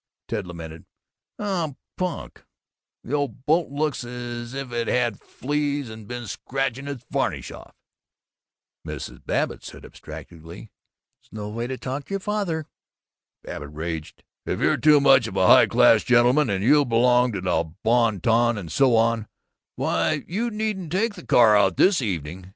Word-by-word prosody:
Ted 105 -5 -3
lamented, 80 -2 -9 0.5
"Oh, 175 -8 -2 0.2
punk! 180 -1 -5 0.6
The 130 - -7
old 145 -2 -2
boat 165 +2 +2
looks 145 -1 -2
as 120 0 -6
if 135 -2 -5
it'd 120 -1 -2
had 120 -2 0
fleas 145 -2 -3
and 110 -2 -11
been 120 0 -6
scratching 135 +3 -3
its 135 -4 -6
varnish - - -2
off." - - -13 1.1
Mrs. - - -7
Babbitt - - -2
said - - -10
abstractedly, 85 +6 -11 0.6
"Snoway 110 +2 -5
talkcher 140 +9 -4
father." 195 -6 -2 0.8
Babbitt 75 -1 -7
raged, 80 0 -6 0.2
"If - - -3
you're - - +3
too 150 -1 +5
much 135 -4 +5
of 100 - -8
a 95 -1 +3
high - - +7
class - - +5
gentleman, 125 +3 +4
and 95 -1 -1
you 145 +5 +5
belong 125 0 +3
to 95 - -3
the 85 -3 -1
bon 115 -4 +2
ton 115 +1 +3
and 90 -6 -7
so 130 -4 +3
on, 115 -1 +2 0.5
why, 155 -2 0
you 225 +7 -2
needn't 210 -6 -3
take 210 +5 0
the 180 -4 -11
car 115 -3 +5
out 95 -3 +3
this 185 -5 +4
evening." 90 - -4
120 Hz, 150 wpm, -24 LUFS, 105-145 Hz, 1.1 s, high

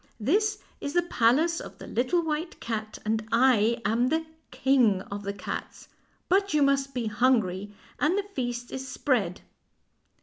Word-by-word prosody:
This 415 - +2 0.2
is 285 - -4
the 350 - +3
palace 320 +3 +2
of - - -9
the - - -10
Little 300 +9 +1
White 320 +2 -3
Cat, 215 -2 -4
and 220 0 0
I 235 -2 +4
am 235 +3 +2
the 320 +3 0 0.2
King 250 -7 +3
of 200 0 -6
the 200 0 -3
Cats. 200 - -7 0.4
But 395 -2 +2
you 295 - +4
must 275 -1 +1
be 245 -2 -1
hungry, 215 -4 +1 0.3
and 320 +7 +2
the 405 - 0
feast 245 -10 -4
is 265 0 -5
spread." 230 - 0
255 Hz, 160 wpm, -27 LUFS, 220-305 Hz, 0.4 s, I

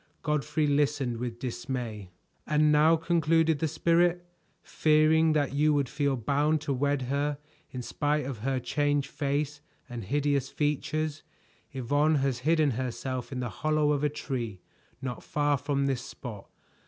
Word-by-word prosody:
Godfrey 150 +1 0
listened 145 -4 +1
with 120 0 -4
dismay. 120 -5 -5 0.4
"And 150 0 +3
now," 155 +2 +5
concluded 165 -1 +2
the 160 - +1
Spirit, 175 +3 +2 0.4
"fearing 155 +1 +3
that 145 -3 +1
you 150 +1 +3
would 140 -2 +1
feel 140 +1 0
bound 145 +6 +1
to 145 -2 -1
wed 140 +1 0
her 140 +3 -1 0.3
in 125 -1 -6
spite 150 +3 -1
of 130 -5 -5
her 130 +3 -1
changed 145 +2 0
face 145 0 -2 0.3
and 120 -3 -6
hideous 140 +2 0
features, 155 +1 -1 0.5
Yvonne 145 +4 +1
has 135 -3 0
hidden 155 +1 +2
herself 130 +1 -4
in 130 -1 -3
the 120 - -2
hollow 155 -1 +2
of 145 -1 0
a 150 - +3
tree 120 -9 -4 0.4
not 125 -2 -4
far 145 -1 +1
from 140 0 -1
this 135 -3 0
spot. 110 -7 -9
145 Hz, 150 wpm, -28 LUFS, 130-150 Hz, 0.5 s, now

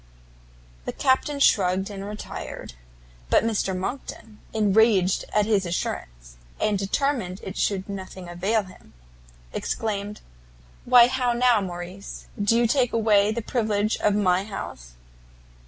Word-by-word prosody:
The - - -3
Captain 280 +2 +1
shrugged 190 -5 +3
and 195 -1 -6
retired. 210 - -7 0.6
But - - +4
Mr 205 -4 0
Monckton, 215 +1 -6
enraged 210 -3 +3
at 210 -1 +2
his 205 -3 +2
assurance, - - -5 0.2
and 215 -1 +1
determined 200 -2 -1
it 190 - -6
should 195 -2 -1
nothing 190 -2 -7
avail 195 +6 0
him, 185 -1 -16 0.6
exclaimed, 210 -1 -3 0.6
"Why 245 -1 +8
how 250 -1 0
now, 240 -2 +3
Morrice, 180 +1 -7 0.2
do 230 +3 +3
you 240 - +3
take 245 0 +2
away 215 -2 +3
the 230 +1 -3
privilege 215 -2 0
of 210 -1 +2
my 185 -2 +2
house?" 60 - -8
205 Hz, 125 wpm, -25 LUFS, 190-225 Hz, 0.6 s, Why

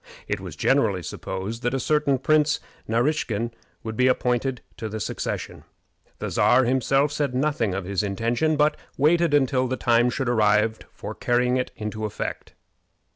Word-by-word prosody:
It - - -2
was - - -8
generally 110 -10 +2
supposed 95 +8 -5
that 120 +2 0
a - - 0
certain 145 0 +2
Prince 150 +2 +2 0.3
Naraskin 115 -2 0 0.3
would 110 -1 -5
be 125 +3 +3
appointed 125 0 0 0.2
to 110 - -4
the 110 +1 -5
succession. - - -4 0.5
The - - -4
Czar 130 +1 +4
himself 135 +3 +2
said 145 -4 -1
nothing 130 -8 0
of 95 -1 -3
his 100 0 -1
intention, 115 +9 0
but 150 +1 +3 0.2
waited 165 +2 +3
until 130 -2 +2
the 130 +1 -2
time 120 0 +3
should 130 +1 -2
arrive 110 -1 +2
for - - -7
carrying 125 +1 +1
it 125 - -1
into 110 0 -4
effect. 105 - -5
125 Hz, 160 wpm, -24 LUFS, 110-140 Hz, 0.5 s, Czar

